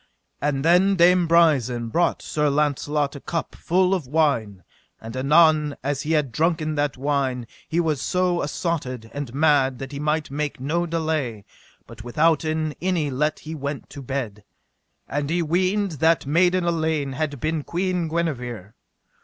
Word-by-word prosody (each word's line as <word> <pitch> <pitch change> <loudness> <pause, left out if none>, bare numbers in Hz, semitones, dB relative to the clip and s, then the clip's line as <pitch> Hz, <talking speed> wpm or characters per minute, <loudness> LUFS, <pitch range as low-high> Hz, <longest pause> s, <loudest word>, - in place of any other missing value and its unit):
And 145 -1 -1
then 180 +4 +4
Dame 180 0 +4
Brisen 135 -9 +3
brought 175 +9 +1
Sir 150 -1 0
Launcelot 145 0 0
a - - -6
cup 165 +4 -4
full 185 +2 +1
of 175 -9 -2
wine; 125 - 0 0.4
and 115 +2 -9
anon 150 +2 +4
as 140 0 -1
he 155 +2 -1
had 150 -5 +1
drunken 160 +1 0
that 145 -2 -1
wine 135 -3 -1 0.2
he 165 - 0
was 155 -5 0
so 180 -1 +1
assotted 135 -7 -3
and 145 -4 -5
mad 140 -4 +3
that 135 +1 -7
he 140 - -6
might 150 0 -1
make 145 -1 -3
no 165 +6 -1
delay, 155 - -2 0.4
but 115 -1 -12
withouten 155 +3 +1
any 170 -5 0
let 150 +4 -1
he 160 - -7
went 140 -1 -5
to 140 - -8
bed; 120 -6 -4 0.6
and 145 0 -2
he 170 +1 +1
weened 185 +5 +1
that 160 0 +3
maiden 175 +5 +3
Elaine 160 -4 0
had 145 0 -3
been 155 +2 -1
Queen 180 0 -1
Guenever. 125 - -3
150 Hz, 155 wpm, -23 LUFS, 135-165 Hz, 0.6 s, then